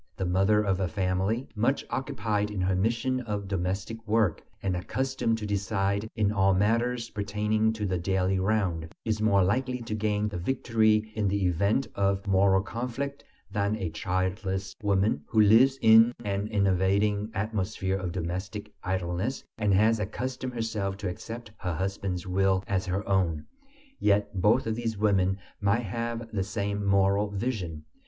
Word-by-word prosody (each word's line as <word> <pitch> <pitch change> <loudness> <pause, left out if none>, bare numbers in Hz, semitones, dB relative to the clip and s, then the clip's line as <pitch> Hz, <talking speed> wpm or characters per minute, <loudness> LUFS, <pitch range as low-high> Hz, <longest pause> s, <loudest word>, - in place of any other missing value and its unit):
The 95 - -1
mother 95 +4 +3
of 95 -2 0
a 95 - +1
family, 95 +7 -1
much 120 +6 +1
occupied 110 -5 -1
in 105 -2 -4
her 95 +1 +1
mission 115 +6 0
of 105 -5 -4
domestic 95 +4 -3
work, 105 -6 +2 0.2
and 95 -2 0
accustomed 130 +5 -1
to 110 - -5
decide 100 +1 -1
in 105 -2 +2
all 95 -2 +3
matters 115 +4 +1
pertaining 105 +1 0
to 110 -1 -3
the 95 -2 -1
daily 95 +1 +1
round, 95 -5 0
is 110 -1 -1
more 100 -3 +4
likely 125 +7 0
to 115 - -4
gain 105 0 0
the 100 -4 -4
victory 110 0 +1
in 105 -2 0
the 100 0 0
event 100 +9 +2
of 100 0 0
moral 95 -1 +3
conflict 125 +6 -4 0.3
than 100 0 0
a 95 -6 -3
childless 95 +2 -2
woman 100 -5 +1
who 110 - +1
lives 115 +6 +6
in 115 +2 +7
an 100 0 -1
enervating 100 +1 +1
atmosphere 100 -2 -1
of 90 -2 -3
domestic 95 +4 -4
idleness, 95 +6 -2 0.2
and 105 -2 +2
has 110 +3 +4
accustomed 125 +5 -4
herself 105 -4 -2
to 100 -2 -3
accept 115 +5 -7
her 90 -3 -2
husband's 95 0 -3
will 95 0 +1
as 95 -1 -1
her 95 +3 -2
own. 90 -6 +1 0.5
Yet 105 0 +2
both 110 +7 +4
of 110 - 0
these 115 -1 -3
women 95 -2 +2 0.2
might 100 +4 +2
have 115 +2 -3
the 100 -3 0
same 100 +1 -2
moral 100 +1 +3
vision. 100 -7 -3
100 Hz, 160 wpm, -28 LUFS, 95-110 Hz, 0.5 s, in